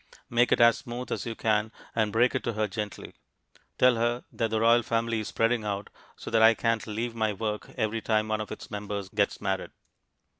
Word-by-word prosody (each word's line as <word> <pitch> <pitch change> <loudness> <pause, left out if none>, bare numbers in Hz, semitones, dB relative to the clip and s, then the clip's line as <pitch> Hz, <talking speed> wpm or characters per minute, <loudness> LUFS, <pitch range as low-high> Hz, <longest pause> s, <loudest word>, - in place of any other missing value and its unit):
Make 120 +1 +3
it - - +4
as 115 0 +6
smooth 120 +1 -7
as - - -3
you 115 - -4
can 110 0 +1 0.2
and 110 -2 +1
break 120 +4 +3
it - - -1
to 120 - -1
her 110 0 0
gently. 105 +1 -6 0.6
Tell 125 -2 +5
her 120 +1 0
that 115 - -1
the 110 0 0
royal 115 +1 +5
family 115 0 0
is 110 - -4
spreading 115 0 +1
out 100 -1 -4 0.2
so - - -8
that 115 -1 +3
I 110 0 +7
can't 115 -2 0
leave 115 +2 -3
my 110 -2 0
work 105 +1 -4
every 110 -1 -1
time 110 -1 +1
one 110 0 0
of 105 - -7
its 110 - -8
members 100 -2 -4
gets 100 -1 0
married. 95 -1 -2
110 Hz, 215 wpm, -28 LUFS, 105-115 Hz, 0.6 s, I